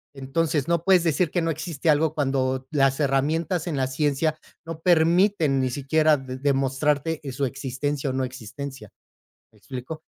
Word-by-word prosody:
Entonces, 145 +2 -1
no 170 -1 +1
puedes 185 -2 +4
decir 165 +1 +1
que 175 +1 -1
no 165 - +1
existe 160 0 -1
algo 155 +1 +1
cuando 130 -2 0
las 135 -2 +2
herramientas 155 +5 0
en 155 -5 -2
la 130 - +1
ciencia 145 +3 0 0.3
no 165 -1 -6
permiten 170 -2 +3
ni 130 - 0
siquiera 150 +4 +2
de 130 -1 -7
demostrarte, 140 +3 0
de 140 - -5
su 135 +2 -1
existencia 135 +2 -3
o - - -2
no 130 0 -1
existencia, 130 -1 -7 0.6
me - - -24
explico. 135 +5 -8
145 Hz, 165 wpm, -24 LUFS, 135-160 Hz, 0.6 s, puedes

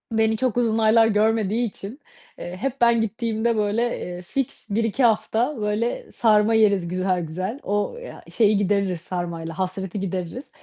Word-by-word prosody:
Beni 220 0 +2
çok 250 -1 -1
uzun 230 -2 +2
aylar 225 0 +5
görmediği 220 +1 +1
için, 210 +5 -9 0.4
eee, 180 +1 -6
hep 270 +4 -4
ben 235 -1 +4
gittiğimde, 225 +1 -1
böyle, 215 +3 0
eee, 180 0 -6
fiks 240 +5 -4
1-2 225 +4 0
hafta 225 +4 +2
böyle 210 +3 -2
sarma 215 -1 +3
yeriz, 200 -5 +3
güzel 185 0 0
güzel 185 - -4
o 205 - -1
ya, - - -10
şeyi, 215 -2 +4
gideririz, 200 -3 0
sarmayla 170 -2 -5
hasreti 190 +1 -3
gideririz. 190 - -5
215 Hz, 150 wpm, -23 LUFS, 190-230 Hz, 0.4 s, aylar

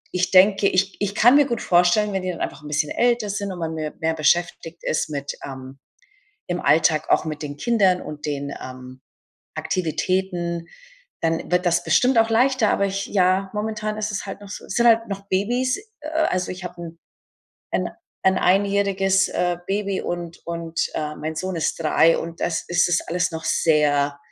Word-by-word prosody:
ich 180 0 +1
denke 195 +1 +5
ich 195 +1 +1
ich 205 0 -1
kann 245 +5 +6
mir 290 0 +6
gut 235 -4 -2
vorstellen, 180 +4 +3
wenn 190 - -1
die 185 - -2
dann 175 - -8
einfach - - -4
'n - - -9
bisschen 150 0 -1
älter 240 -3 +1
sind 200 -1 -3
und 185 - -7
man 165 -1 -3
mir 155 -1 -4
mehr 160 0 0
beschäftigt 165 +1 0
ist 155 - -1
mit, 140 -2 -4
ähm, 135 0 -9 0.7
im 175 0 -2
Alltag 155 +1 +3
auch - - +3
mit 155 -1 -5
den 145 -1 -6
Kindern 195 -2 +2
und 150 -1 -7
den, 140 -1 -3
ähm, 130 0 -10 0.5
Aktivitäten, 175 0 -2 0.6
dann 165 0 -1
wird 180 +1 +2
das 175 0 +2
bestimmt 240 +10 +3
auch 225 0 +4
leichter, 245 0 +3
aber 200 - +1
ich 195 0 -3
ja, 190 0 +2
momentan 215 0 -3
ist 215 0 -2
es 205 - -4
halt 195 - -7
noch 200 - -11
so, - - -7
sind 235 +4 +2
halt 230 0 +4
noch 200 0 -6
Babys, 245 - 0 0.2
äh, 300 - -8
also 250 - 0
ich 185 0 -9
habe 180 0 -6
'n 165 -1 -9 0.8
'n - - 0 0.3
'n 190 0 +4
einjähriges, 195 0 +2
äh, 175 -1 0
Baby 200 -1 -1
und 175 -1 -5
und, 170 -1 -3
ähm, 150 -1 -4
mein 160 +1 -3
Sohn 185 +2 -3
ist 160 - 0
3 165 +1 +4
und 165 0 -6
das 170 - -1
ist 175 0 +3
es 175 - +2
alles 175 +1 -1
noch 160 0 -6
sehr 145 -2 +2
180 Hz, 190 wpm, -22 LUFS, 160-200 Hz, 0.8 s, kann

